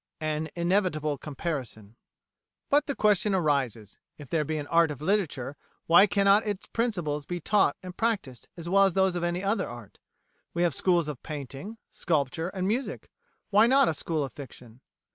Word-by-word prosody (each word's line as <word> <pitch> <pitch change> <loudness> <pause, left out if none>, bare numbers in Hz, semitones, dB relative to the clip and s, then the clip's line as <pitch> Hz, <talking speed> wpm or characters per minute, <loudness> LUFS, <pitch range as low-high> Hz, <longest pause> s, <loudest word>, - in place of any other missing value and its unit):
An 155 0 -2
Inevitable 170 -5 0
Comparison 135 -8 -5 0.8
But 290 +1 +3
the 280 - -2
question 210 -1 +2
arises: 135 - -1 0.2
If 145 -4 -11
there 160 -2 +1
be 155 +1 -3
an 145 - -4
art 165 +2 +3
of 145 -3 -6
literature, 155 -7 -1 0.3
why 175 +5 +7
cannot 200 +2 +4
its 205 -3 -4
principles 175 - -2
be 175 0 -3
taught 205 +5 +2
and 180 -1 -8
practised 195 - -2
as 170 0 -7
well 195 +2 +5
as 195 - +1
those 190 -1 +2
of 175 - -2
any 175 +2 -1
other 200 +3 0
art? 120 -4 -11 0.6
We 170 - +1
have 170 -4 +2
schools 175 +2 +2
of 145 -5 -6
Painting, 150 - -7
Sculpture, 160 +1 -1
and 185 -1 -3
Music 245 +6 -3 0.4
why 210 +3 +6
not 270 +1 +5
a - - 0
school 155 0 -2
of 135 -3 -6
Fiction? 125 -3 -12
170 Hz, 175 wpm, -27 LUFS, 145-195 Hz, 0.8 s, why